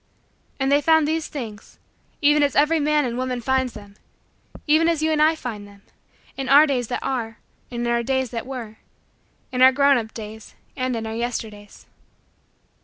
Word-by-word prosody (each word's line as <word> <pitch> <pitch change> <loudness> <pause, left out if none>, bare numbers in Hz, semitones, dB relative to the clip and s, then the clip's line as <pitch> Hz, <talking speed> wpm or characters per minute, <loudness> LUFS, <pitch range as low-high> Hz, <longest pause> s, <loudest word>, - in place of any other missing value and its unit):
And 270 +1 0
they 285 +1 +4
found 320 0 +3
these 320 0 -1
things 225 -7 -8 0.5
even 295 +1 +5
as 285 -2 +1
every 310 +3 +3
man 300 -1 +2
and 240 0 -3
woman 255 -1 -2
finds 260 +1 0
them, 205 -1 -13 0.7
even 320 +2 +3
as 320 -2 0
you 315 - +2
and 305 -1 +1
I 315 +1 +4
find 215 -8 -7
them, 200 0 -18 0.5
in 270 -2 -4
our 285 +3 +8
days 255 -5 -1
that 245 - -4
are 230 -4 -3 0.3
and 240 -1 -4
in - - -1
our 235 0 +1
days 260 0 -1
that 235 +1 -5
were 235 -5 -7 0.7
in 250 0 -2
our 260 +1 +8
grown 280 0 +4
up 220 -1 -7
days 220 -1 -10 0.2
and 255 -2 -2
in 225 -1 -4
our 220 - -5
Yesterdays. 220 -3 -6
255 Hz, 185 wpm, -22 LUFS, 230-290 Hz, 0.7 s, our